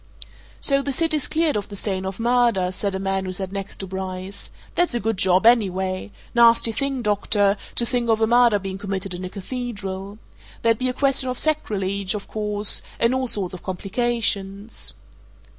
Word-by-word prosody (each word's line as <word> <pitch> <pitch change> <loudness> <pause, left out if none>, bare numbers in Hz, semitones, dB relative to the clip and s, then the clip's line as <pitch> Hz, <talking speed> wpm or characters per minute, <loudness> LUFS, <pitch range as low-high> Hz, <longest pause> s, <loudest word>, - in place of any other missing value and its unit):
"So 275 -1 +3
the 280 - -2
city's 310 0 +1
cleared 320 -1 +1
of 205 -1 -3
the 205 - -7
stain 190 -1 -2
of 190 +2 -6
murder!" 235 -6 +2
said 195 +1 -2
a - - -2
man 195 0 -1
who 185 - -3
sat 190 0 -4
next 195 0 -3
to 195 - -5
Bryce. 190 +1 -5 0.2
"That's 350 -8 +1
a - - +1
good 225 +1 0
job, 185 +2 +3
anyway! 190 -5 +3 0.2
Nasty 235 -1 +6
thing, 270 +2 -2
doctor, 205 -1 +2 0.2
to 235 - +1
think 240 -1 -1
of 220 -1 +3
a 220 - +4
murder 235 -1 +5
being 195 -1 -5
committed 195 -1 -3
in 180 +1 -6
a - - -5
cathedral. 200 -2 -5 0.5
There'd 230 -1 +3
be 255 0 +1
a - - -2
question 270 -1 +2
of 250 - -3
sacrilege, 200 -10 0
of 200 - -6
course 210 -1 +1 0.2
and 235 +2 +3
all 260 0 0
sorts 195 -6 -2
of 185 - -7
complications." 200 - -1
205 Hz, 185 wpm, -23 LUFS, 190-240 Hz, 0.5 s, Nasty